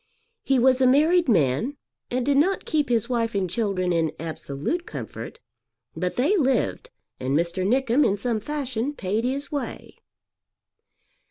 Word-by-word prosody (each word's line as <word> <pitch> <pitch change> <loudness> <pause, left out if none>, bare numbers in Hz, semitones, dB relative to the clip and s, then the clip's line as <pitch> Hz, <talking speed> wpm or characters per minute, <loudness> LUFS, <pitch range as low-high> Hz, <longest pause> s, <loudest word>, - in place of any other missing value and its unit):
He 270 - +2
was 255 +1 +4
a 260 - +5
married 310 +5 +4
man 175 - +2 0.3
and 250 0 -1
did 280 0 +2
not 375 +7 +2
keep 300 -3 0
his 235 -2 +1
wife 230 -3 -1
and 195 -2 +1
children 185 -2 -1
in 165 -2 +1
absolute 160 - -4
comfort; 460 - -7 0.6
but 180 0 -2
they 295 +12 +2
lived, 275 - 0 0.3
and 135 +3 0
Mr. 170 +3 -1
Nickem 260 +3 +3
in 200 - +2
some 235 0 -1
fashion 270 -1 -3
paid 210 -2 -2
his 275 +3 -2
way. 285 -2 -5
245 Hz, 150 wpm, -24 LUFS, 185-280 Hz, 0.6 s, a